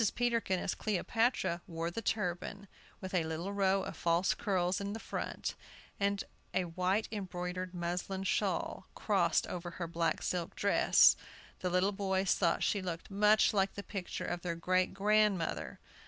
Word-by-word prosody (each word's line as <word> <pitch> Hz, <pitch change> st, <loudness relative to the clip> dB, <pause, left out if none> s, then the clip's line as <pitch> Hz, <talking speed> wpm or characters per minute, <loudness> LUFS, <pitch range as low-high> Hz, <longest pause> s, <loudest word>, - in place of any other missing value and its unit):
Peterkin, 230 Hz, -6 st, +1 dB
as -, -, -1 dB
Cleopatra, 210 Hz, -3 st, 0 dB
wore 165 Hz, -1 st, -3 dB
the 230 Hz, -, -4 dB
turban, 200 Hz, -1 st, -2 dB, 0.3 s
with 190 Hz, -1 st, -6 dB
a 180 Hz, -3 st, +2 dB
little 160 Hz, +5 st, -3 dB
row 195 Hz, -1 st, +2 dB
of -, -, -6 dB
false 170 Hz, +2 st, +2 dB
curls 185 Hz, -2 st, 0 dB
in 200 Hz, +1 st, -3 dB
front, -, -, -4 dB, 0.5 s
and 200 Hz, 0 st, +1 dB, 0.3 s
a 185 Hz, -, +3 dB
white 185 Hz, +5 st, 0 dB
embroidered 185 Hz, -2 st, -4 dB
muslin 180 Hz, +2 st, -2 dB
shawl 195 Hz, -, -1 dB
crossed 180 Hz, -6 st, +2 dB
over 175 Hz, -1 st, -5 dB
her 170 Hz, 0 st, -5 dB
black 165 Hz, 0 st, -1 dB
silk 175 Hz, -2 st, -2 dB
dress. 200 Hz, -, +5 dB, 0.4 s
The 180 Hz, -, -1 dB
little 180 Hz, +3 st, +2 dB
boys 195 Hz, -1 st, +1 dB
thought 170 Hz, -3 st, +1 dB
she 200 Hz, -, +1 dB
looked 175 Hz, 0 st, -5 dB
much 210 Hz, +2 st, +4 dB
like 195 Hz, -1 st, +1 dB
the 200 Hz, -, -5 dB
picture 195 Hz, -4 st, -5 dB
of 175 Hz, -, -3 dB
their 170 Hz, -1 st, -2 dB
great 185 Hz, +2 st, +1 dB
grandmother. 205 Hz, -3 st, +1 dB
185 Hz, 155 wpm, -33 LUFS, 175-200 Hz, 0.5 s, dress